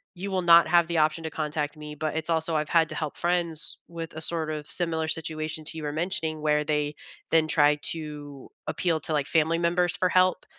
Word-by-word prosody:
you 195 Hz, +3 st, -5 dB
will 185 Hz, -1 st, 0 dB
not 170 Hz, -1 st, +7 dB
have 170 Hz, 0 st, +4 dB
the 170 Hz, -1 st, -1 dB
option 155 Hz, +1 st, +2 dB
to 160 Hz, -, -3 dB
contact 150 Hz, -1 st, -3 dB
me." 150 Hz, 0 st, -8 dB
But 155 Hz, +1 st, -3 dB
it's 160 Hz, -, -3 dB
also 160 Hz, 0 st, 0 dB
I've 150 Hz, 0 st, -1 dB
had 165 Hz, -2 st, +3 dB
to 155 Hz, -, -6 dB
help 155 Hz, -1 st, -3 dB
friends 170 Hz, -3 st, -1 dB
with 165 Hz, -1 st, -7 dB
a 155 Hz, -, -6 dB
sort 160 Hz, -1 st, -1 dB
of 150 Hz, -1 st, -5 dB
similar 160 Hz, -2 st, 0 dB
situation 155 Hz, 0 st, -3 dB
to 160 Hz, -, -6 dB
you 155 Hz, -, -6 dB
were 145 Hz, -, -2 dB
mentioning 160 Hz, -1 st, -1 dB
where 150 Hz, 0 st, +2 dB
they 150 Hz, -1 st, -1 dB, 0.4 s
then 160 Hz, -1 st, +4 dB
try 150 Hz, -2 st, +4 dB, 0.2 s
to 150 Hz, -4 st, -8 dB, 0.2 s
appeal 170 Hz, -4 st, 0 dB
to, 160 Hz, -, -3 dB
like, 145 Hz, -2 st, 0 dB
family 165 Hz, 0 st, +2 dB
members 175 Hz, +1 st, +1 dB
for 185 Hz, -, +1 dB
help, 185 Hz, 0 st, +3 dB
160 Hz, 220 wpm, -26 LUFS, 150-170 Hz, 0.4 s, not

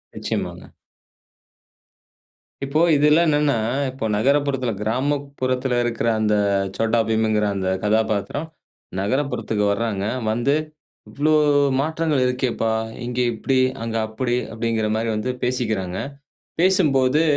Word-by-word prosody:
நிச்சயமாங்க. -, -, -4 dB, 1.9 s
இப்போ 145 Hz, +4 st, +1 dB
இதுல்லாம் 150 Hz, +3 st, +4 dB
என்னென்னா 145 Hz, -4 st, +2 dB, 0.3 s
இப்ப 130 Hz, -3 st, -5 dB
நகரப்புறத்தில 135 Hz, +1 st, +1 dB
கிராமப்புறத்தில 130 Hz, +1 st, -1 dB
இருக்கிற 120 Hz, -1 st, -1 dB
அந்த 105 Hz, -1 st, +2 dB, 0.4 s
Chhota 115 Hz, +1 st, +1 dB
Bheem 110 Hz, 0 st, +1 dB
ங்கிற 105 Hz, -1 st, +1 dB
அந்த 95 Hz, -1 st, -1 dB
கதாபாத்திரம் 110 Hz, +6 st, 0 dB, 0.5 s
நகரப்புறத்துக்கு 110 Hz, -1 st, -1 dB
வர்றாங்க. 100 Hz, -2 st, -1 dB, 0.3 s
வந்து, 120 Hz, +5 st, +1 dB, 0.6 s
"இவ்வளோ 150 Hz, +2 st, 0 dB, 0.5 s
மாற்றங்கள் 155 Hz, -1 st, 0 dB
இருக்கேப்பா, 125 Hz, -3 st, 0 dB, 0.3 s
இங்கே 125 Hz, +1 st, -1 dB
இப்படி 130 Hz, +4 st, 0 dB, 0.3 s
அங்க 115 Hz, 0 st, -4 dB
அப்படி" 120 Hz, +3 st, -2 dB, 0.2 s
அப்படிங்கிற 115 Hz, -1 st, -1 dB
மாரி 115 Hz, +1 st, -1 dB
வந்து 110 Hz, +4 st, -1 dB
பேசிக்கிறாங்க. 110 Hz, -8 st, -1 dB, 0.6 s
பேசும்போது 150 Hz, -6 st, +3 dB
125 Hz, 100 wpm, -22 LUFS, 110-140 Hz, 1.9 s, இதுல்லாம்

